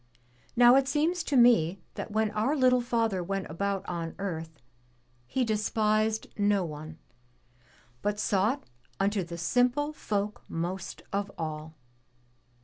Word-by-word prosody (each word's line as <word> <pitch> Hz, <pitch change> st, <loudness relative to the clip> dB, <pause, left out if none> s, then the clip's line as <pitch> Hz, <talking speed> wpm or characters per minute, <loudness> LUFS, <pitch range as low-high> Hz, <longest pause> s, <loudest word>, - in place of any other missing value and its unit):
Now 245 Hz, +1 st, +7 dB
it 270 Hz, 0 st, +2 dB
seems 320 Hz, +5 st, +1 dB
to 280 Hz, -, +1 dB
me 195 Hz, -7 st, +5 dB
that -, -, -5 dB
when 215 Hz, 0 st, +1 dB
our 220 Hz, +8 st, +1 dB
little 255 Hz, -3 st, +4 dB
Father 230 Hz, -5 st, 0 dB
went 195 Hz, +2 st, -2 dB
about 195 Hz, +3 st, -2 dB
on 170 Hz, -2 st, -4 dB
earth. 165 Hz, -5 st, -5 dB, 0.7 s
He 255 Hz, -, 0 dB
despised 215 Hz, 0 st, +1 dB
no 205 Hz, -2 st, +3 dB
one, 155 Hz, 0 st, -8 dB, 1.0 s
but 205 Hz, 0 st, -1 dB
sought 210 Hz, +7 st, +1 dB, 0.4 s
unto 200 Hz, 0 st, +1 dB
the 170 Hz, 0 st, -7 dB
simple 250 Hz, -, +1 dB
folk 210 Hz, -6 st, -2 dB
most 175 Hz, +3 st, -4 dB
of 200 Hz, 0 st, -1 dB
all. 155 Hz, -1 st, -5 dB
205 Hz, 130 wpm, -29 LUFS, 175-240 Hz, 1.0 s, Now